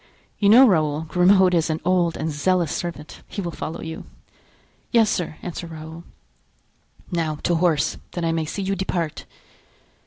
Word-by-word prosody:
You 200 - +4
know, 245 +5 +9
Raoul, 155 -6 +2
Grimaud 180 +3 +4
is 165 -2 +2
an 155 0 -1
old 175 -2 +2
and 160 +1 -2
zealous 170 +2 +1
servant; 170 -4 -6
he - - -7
will 175 -3 -3
follow 160 - -6
you." 160 0 -7 0.9
"Yes, 225 -3 +4
sir," 165 -3 -3
answered 170 -1 -6
Raoul. 160 +1 -9 1.1
"Now 165 -3 -1
to 175 - +1
horse, 165 -3 +1 0.2
that 175 -2 -2
I 165 - +1
may 165 -1 -1
see 195 +6 -4
you 195 +1 -1
depart!" 175 -4 -3
170 Hz, 160 wpm, -23 LUFS, 160-185 Hz, 1.1 s, know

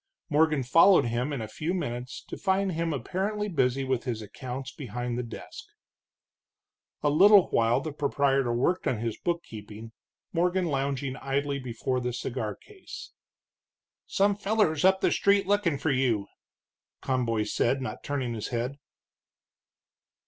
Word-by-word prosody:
Morgan 150 -2 +3
followed 165 +9 +6
him 120 +4 -1
in 140 -5 -3
a - - -5
few 155 - -3
minutes, 125 -7 -4
to - - -7
find 195 0 +1
him 165 0 -1
apparently 195 - -2
busy 135 -7 +1
with 130 -2 -1
his 115 -4 -3
accounts 130 +5 -6
behind 120 -3 -4
the 125 - -1
desk. 115 -2 -9 1.4
A 145 - +3
little 195 +5 +6
while 115 +1 +3
the 155 -2 -5
proprietor 140 -3 +1
worked 135 +10 +1
on 125 - +1
his 115 0 -3
bookkeeping, 110 -10 -5 0.4
Morgan 180 +2 +1
lounging 135 -3 -2
idly 140 +1 -1
before 125 0 -2
the 125 0 -3
cigar 120 -3 -3
case. 405 -3 -11 1.0
"Some 200 0 +2
fellers 200 -7 +1
up 190 +1 +4
the - - +3
street 200 0 +3
lookin' 195 -6 +1
for 155 - 0
you," 125 -6 +1 0.8
Conboy 120 -4 0
said, 125 +5 +1
not 130 - -6
turning 130 -4 -2
his 110 -2 -4
head. 125 +4 -3
135 Hz, 140 wpm, -28 LUFS, 120-170 Hz, 1.4 s, followed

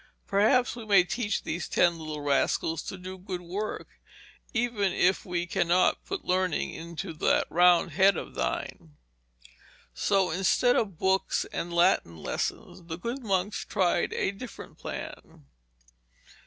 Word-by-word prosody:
Perhaps 225 +6 +3
we 235 - -7
may 200 -4 +5
teach 205 +3 -2
these 165 +1 -4
ten 170 -1 +3
little 155 -1 -5
rascals 145 +3 +1
to 190 - -7
do 185 +1 -8
good 180 -1 -5
work, 195 +5 -4 0.6
even 225 -5 0
if 185 +2 +2
we 175 -1 -1
cannot 175 0 +2
put 390 -1 -5
learning 185 -2 0
into 170 +2 -6
that 155 - +2
round 175 0 +5
head 190 +4 +4
of - - -6
thine.' 75 +4 -4 1.0
So 190 - +1
instead 195 +8 +3
of 195 -7 -1
books 190 +2 +1
and 175 - -3
Latin 170 - +2
lessons, 165 - -4
the 160 -1 -5
good 235 +9 -4
monks 200 -2 -1
tried 180 -4 +1
a - - 0
different 225 +3 -10
plan. 70 - -8
185 Hz, 140 wpm, -28 LUFS, 170-200 Hz, 1.0 s, may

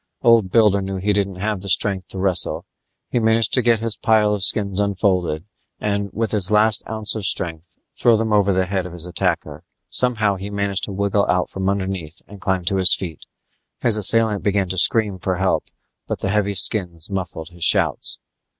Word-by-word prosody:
Old 115 -5 +4
Builder 105 -1 +3
knew 95 0 -5
he 100 +2 -1
didn't 100 -2 -1
have 100 +1 -3
the 100 - -4
strength 95 -1 +1
to - - -8
wrestle; 95 -1 +1 0.5
he 120 - +1
managed 110 -1 +1
to 130 - +2
get 115 -2 +2
his 115 -2 -3
pile 110 -2 +2
of 105 - -3
skins 100 0 +3
unfolded 95 -5 -1 0.3
and, 100 -1 -2
with 110 +1 -2
his 100 -4 -1
last 105 0 +4
ounce 110 -1 0
of 110 - -5
strength, 85 -2 -2 0.2
throw 115 -2 +3
them 110 0 -1
over 100 -1 +3
the 95 0 +1
head 95 -1 -3
of 90 - -11
his 85 -1 -3
attacker. 90 - -2 0.3
Somehow 110 -5 0
he 100 +2 -7
managed 100 -1 -2
to - - -8
wiggle 100 +1 0
out 90 0 0
from 95 0 -2
underneath 95 -5 -4
and 100 -1 -13
climb 95 -2 -1
to 95 +3 0
his 95 -1 +6
feet. 85 -6 -8 0.5
His 115 -3 +4
assailant 110 0 +3
began 100 -2 0
to 95 - -3
scream 105 -2 +3
for 95 +1 -2
help, 95 +1 -1 0.4
but - - -3
the 95 - -2
heavy 100 0 0
skins 85 -2 +1
muffled 85 -4 -5
his 85 -1 -8
shouts. - - +2
100 Hz, 195 wpm, -20 LUFS, 95-105 Hz, 0.5 s, his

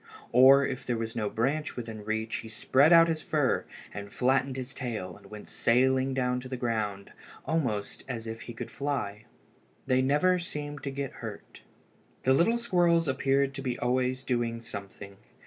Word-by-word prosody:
Or 135 +3 +7
if 135 0 -4
there 120 - -1
was 115 0 -4
no 105 -3 -1
branch 140 +8 -1
within 115 -3 -6
reach, 110 +1 -2
he 110 - -8
spread 135 +7 +3
out 165 -1 +8
his 160 -1 -1
fur, 150 -4 +1 0.3
and 100 0 -7
flattened 130 +1 +1
his 130 0 -5
tail, 110 -9 -5
and 100 -1 -16
went 105 -1 -10
sailing 130 +2 +2
down 125 -1 0
to 130 0 -9
the 130 - -4
ground, 110 -5 -2 0.3
almost 125 -11 -2
as 115 -4 -5
if 115 0 -6
he 120 - -8
could - - -6
fly. 120 -7 -3 0.6
They 130 -1 +3
never 150 +8 +3
seemed 145 -4 -6
to - - -1
get 135 -1 -4
hurt. - - -9 0.6
The 130 - +4
little 175 - +3
squirrels 175 -7 +2
appeared 135 +1 +1
to 135 - -6
be 125 -2 -2
always 130 +1 0
doing 120 -3 -1
something. 100 -3 -8
130 Hz, 175 wpm, -29 LUFS, 115-140 Hz, 0.6 s, out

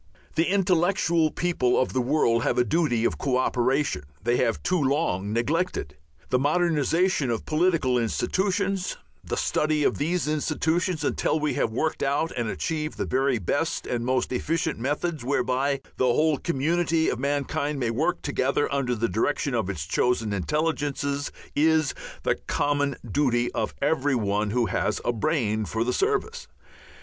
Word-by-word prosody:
The 165 +2 +1
intellectual 175 -3 +2
people 155 -8 +1
of 130 - 0
the 130 - +1
world 120 -3 +2
have - - 0
a 125 - +5
duty 120 -2 +1
of - - 0
co 130 -2 +1
operation 130 - +1 0.2
they 120 +2 +2
have 115 - 0
too 180 -2 +1
long 130 - 0
neglected. 120 - -1 0.3
The 125 - +2
modernization 160 0 +2
of 115 -1 -2
political 155 -6 +2
institutions, 190 - -1 0.3
the - - -3
study 150 -1 +1
of - - +1
these 165 +2 0
institutions 160 +2 0
until 155 - 0
we 150 0 0
have - - 0
worked 155 +8 -1
out 145 +4 0
and 120 -2 -1
achieved 155 +3 -3
the - - -1
very 135 -1 +1
best 145 - -1
and 120 -1 -2
most 130 0 0
efficient 160 +4 -1
methods 145 +3 -2
whereby 135 +1 0 0.2
the 130 - +2
whole 150 +3 +2
community 165 +2 +1
of 125 - -1
mankind 145 +1 -1
may 120 -3 0
work 165 +9 -1
together 140 0 0
under 130 -3 0
the 115 +1 0
direction 140 +4 0
of 110 -5 0
its 80 -7 -4
chosen 115 +4 0
intelligences, 145 - -1 0.2
is 155 -1 +3 0.3
the - - +1
common 145 -1 0
duty 120 0 +1
of 110 -2 -2
every 145 -2 +2
one 105 -2 0
who 120 +2 +1
has 95 - -1
a 120 - +1
brain 110 -4 0
for 110 +2 -1
the 125 - -1
service. 440 +4 -1
145 Hz, 160 wpm, -25 LUFS, 120-160 Hz, 0.3 s, a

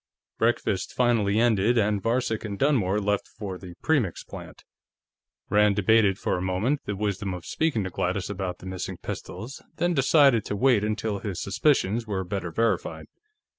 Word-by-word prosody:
Breakfast 110 -4 0
finally 110 -4 +2
ended, 115 0 +3
and 105 -2 +2
Varcek 115 0 0
and 100 -3 -5
Dunmore 105 -8 +2
left 105 0 -1
for 95 -4 -7
the 90 -2 -10
Premix 130 - +1
plant. - - -11 0.9
Rand 105 -1 +4
debated 100 -1 +3
for - - -1
a - - -5
moment 95 +10 0
the 105 - -3
wisdom 100 -1 -2
of 90 - -9
speaking 155 -10 0
to 95 - -4
Gladys 90 +2 -1
about 95 -2 -4
the - - -13
missing 95 -1 -5
pistols, 115 +10 -7
then 175 0 +1
decided 135 -4 +4
to 105 - -3
wait 120 -1 +3
until 105 -1 -2
his 95 -4 -4
suspicions 115 0 +1
were 95 -3 -2
better 95 -1 -4
verified. 115 +7 -1
105 Hz, 165 wpm, -26 LUFS, 95-115 Hz, 0.9 s, Rand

